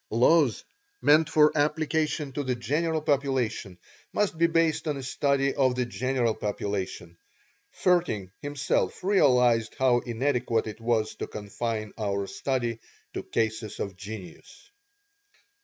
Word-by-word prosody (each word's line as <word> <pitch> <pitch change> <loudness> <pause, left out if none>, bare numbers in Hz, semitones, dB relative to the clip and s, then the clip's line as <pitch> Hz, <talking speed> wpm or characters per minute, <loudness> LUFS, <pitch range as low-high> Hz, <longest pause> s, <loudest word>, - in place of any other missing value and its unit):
Laws 125 +3 +3 0.4
meant 155 +1 +4
for 150 0 +4
application 155 -1 0
to 145 +2 -3
the 130 -2 -1
general 155 +5 -1
population 130 -10 0 0.4
must 205 -4 +1
be 170 +1 +3
based 165 -1 +1
on 150 -2 -1
a 135 - -6
study 140 +1 +1
of 130 -3 +2
the 125 -1 0
general 120 -1 0
population. 95 -5 -4 0.6
Vaerting, 170 - +2
himself, 145 +3 -1
realized 125 - +3
how 130 -2 +4
inadequate 120 -1 0
it 110 +1 -7
was 115 -2 0
to - - -4
confine 110 +1 -4
our 100 -2 -1
study 120 0 -2 0.3
to - - -3
cases 110 -1 -2
of 100 -2 -4
genius. 100 - -10
125 Hz, 125 wpm, -27 LUFS, 110-150 Hz, 0.6 s, meant